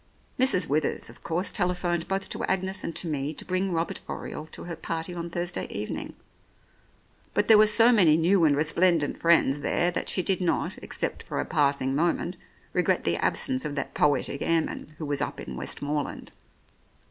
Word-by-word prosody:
Mrs. 250 -9 +3
Withers, 150 0 -1
of - - -17
course, 175 +4 -1
telephoned 180 -2 -1
both 195 +1 -1
to - - -4
Agnes 190 0 -1
and 165 - -4
to 175 - -3
me 150 0 -2
to - - -7
bring 185 +1 -1
Robert 165 0 -1
Oriole 155 - -6
to - - -7
her 175 -1 -5
party 165 +2 -4
on 170 -1 -5
Thursday 175 +1 -3
evening; 105 +1 -5 1.2
but - - +2
there 220 - +8
were 215 - +7
so 230 +3 +6
many 175 -9 +5
new 175 +2 +3
and 150 -3 +4
resplendent 160 +1 +1
friends 165 -4 +3
there 175 +4 +1
that - - -3
she 185 - 0
did 190 0 +1
not, 175 -2 0
except - - -3
for - - -4
a - - -1
passing 140 -2 +1
moment, 170 +3 0 0.4
regret - - +1
the - - +1
absence 260 -2 0
of 145 - -4
that 140 - -3
poetic 145 -1 +1
airman, 160 -2 -1
who 155 - -5
was 145 -1 0
up - - -3
in 65 - -7
Westmorland. 145 - -4
170 Hz, 180 wpm, -27 LUFS, 150-185 Hz, 1.2 s, there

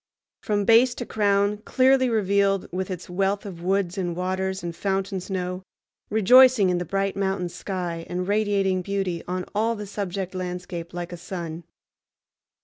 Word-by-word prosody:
From 205 -1 0
base 235 +3 +5
to 245 - -5
crown 205 -1 +1
clearly 260 +3 +3
revealed 200 -3 +2
with 185 +1 -3
its 180 -2 -6
wealth 195 +3 -1
of 180 -4 -8
woods 190 +1 0
and 175 -2 -2
waters 190 +1 -2
and 170 -1 -4
fountain 195 +1 -1
snow, 185 0 -4 0.5
rejoicing 225 -1 +6
in 175 - 0
the 175 - -3
bright 195 +3 -1
mountain 190 -2 -1
sky, 175 -3 -5
and 180 +1 -3
radiating 200 -3 +1
beauty 190 -3 -2
on 180 0 -3
all 225 +3 +1
the 210 -1 -6
subject 195 -2 -4
landscape 180 -1 -5
like 175 0 -5
a - - -6
sun. 170 -2 -6
190 Hz, 155 wpm, -25 LUFS, 180-205 Hz, 0.5 s, rejoicing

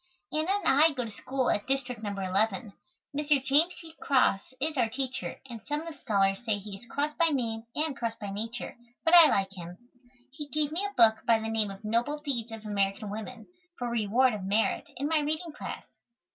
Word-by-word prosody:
Anna 310 +3 0
and 405 +1 +1
I 320 -1 +6
go 250 -3 -3
to 225 - -7
school 255 +4 -1
at 205 - -1
District 255 -4 -1
No. 210 - -3
11. 195 +2 0 0.4
Mr. 290 -2 +2
James 310 +6 +4
C. 325 -1 -11
Cross 260 -4 +2
is 310 +3 -1
our 235 -4 +2
teacher, 260 +2 -4
and 235 -3 -8
some 295 +1 -1
of 330 0 -7
the 290 - -18
scholars 195 0 +1
say 220 -3 0
he 200 0 -8
is 210 +5 -13
cross 290 +5 -1
by 335 +1 +3
name 230 -6 -1
and 305 -2 0
cross 230 -3 -3
by 205 -3 -6
nature, 225 +4 -5 0.3
but 325 - +3
I 335 -3 +10
like 195 -1 +1
him. 175 -1 -8 0.5
He 295 +1 -7
gave 295 +1 0
me 345 +6 -1
a 405 - -10
book 220 -1 +6
by 230 -1 +6
the 220 0 -4
name 220 -2 +1
of 195 +2 -9
"Noble 235 +7 0
Deeds 250 -6 -3
of 225 -1 -8
American 200 0 -1
Women," 220 +2 -7 0.3
for 245 -1 -3
reward 235 +3 +3
of 205 -3 -5
merit, 205 +4 +1
in 280 +3 -1
my 320 0 +2
reading 310 +3 -2
class. 300 - -7
240 Hz, 215 wpm, -29 LUFS, 215-295 Hz, 0.5 s, I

